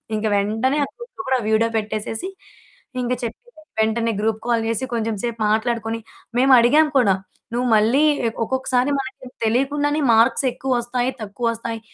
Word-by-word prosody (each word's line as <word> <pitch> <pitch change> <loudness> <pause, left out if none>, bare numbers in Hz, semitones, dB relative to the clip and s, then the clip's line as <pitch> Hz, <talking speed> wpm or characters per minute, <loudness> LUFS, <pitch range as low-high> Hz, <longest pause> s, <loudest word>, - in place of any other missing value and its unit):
ఇంక 215 - -2
వెంటనే 220 +8 +1
ఆ - - -10
గ్రూప్‌లో 480 -5 -9
కూడా 260 -1 +3
వీడియో 225 +1 +3
పెట్టేసేసి 215 - -3 0.7
ఇంకా 250 +1 0
చెప్పి, 230 - -5 0.4
వెంటనే 225 +1 +1
గ్రూప్ 220 0 -1
కాల్ 235 -2 +1
జేసి 230 +3 -1
కొంచెం 225 -1 -1
సేపు 235 -1 -3
మాట్లాడుకొని 225 0 -1 0.4
మేమడిగాం 265 +4 +6
కూడా. 205 -7 +4 0.4
నువ్వు 245 +1 0
మళ్ళీ 225 +7 +3 0.3
ఎక్ 225 - -5
ఒక్కొక్కసారి 260 +1 0
మనకి 260 -1 -7 0.2
తెలియకుండానే 290 +6 +1
మార్క్స్ 235 +4 +3
ఎక్కువస్తాయి, 250 -1 -1
తక్కువస్తాయి. 230 +2 -3
235 Hz, 135 wpm, -21 LUFS, 225-260 Hz, 0.7 s, మేమడిగాం